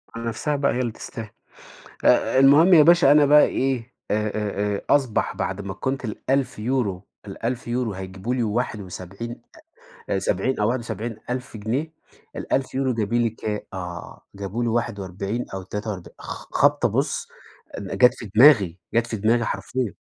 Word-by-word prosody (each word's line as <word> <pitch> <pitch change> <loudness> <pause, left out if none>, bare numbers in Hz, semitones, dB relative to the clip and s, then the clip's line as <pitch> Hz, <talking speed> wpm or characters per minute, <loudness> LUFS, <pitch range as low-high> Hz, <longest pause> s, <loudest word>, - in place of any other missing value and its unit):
على 115 0 -5
نفسها 145 +6 -1
بقى 140 0 +1
هي 125 - -2
اللي 120 -3 -1
تستاهل، 110 -1 -8 0.8
آآ 130 - +4
المهم 150 +7 +7
يا 155 -3 +9
باشا 170 -3 +6
أنا 145 -1 +6
بقى 150 +1 +7
إيه، 130 -2 -2 0.2
آآ، - - +3
آآ، 105 -1 -2
آآ، - - -4
أصبح 135 -6 +2
بعد 95 +2 -3
ما 95 -1 -5
كنت 130 +4 -3
ال1000€، 125 -4 -1 0.2
ال1000€ 120 +1 -3
هايجيبوا 95 +5 -5
لي 120 - 0
واحد 110 0 -1
وسبعين 100 +6 -8 0.7
أ - - +1
سبعين 135 - -1
أو 105 - +2
71.000 120 +1 -4
جنيه، 130 +10 -2 0.6
1000€ 130 -1 0
جايبين 115 +2 0
لي 115 - +2
كام؟ 105 -1 -4
آه 90 -2 -7
جابوا 100 +4 -3
لي 115 - 0
41.000 100 -1 -2
أو 95 -1 -5
تلاتة 105 +3 -5
وأرب 90 -3 -7
خ-خبطة - - +1
بُص - - -1 0.5
جات 110 +6 +3
في 110 - -9
دماغي، 110 - +6 0.2
جات 115 0 +2
في 110 - -3
دماغي 115 +4 +2
حرفيًا. 110 +4 -3
115 Hz, 150 wpm, -23 LUFS, 100-130 Hz, 0.8 s, يا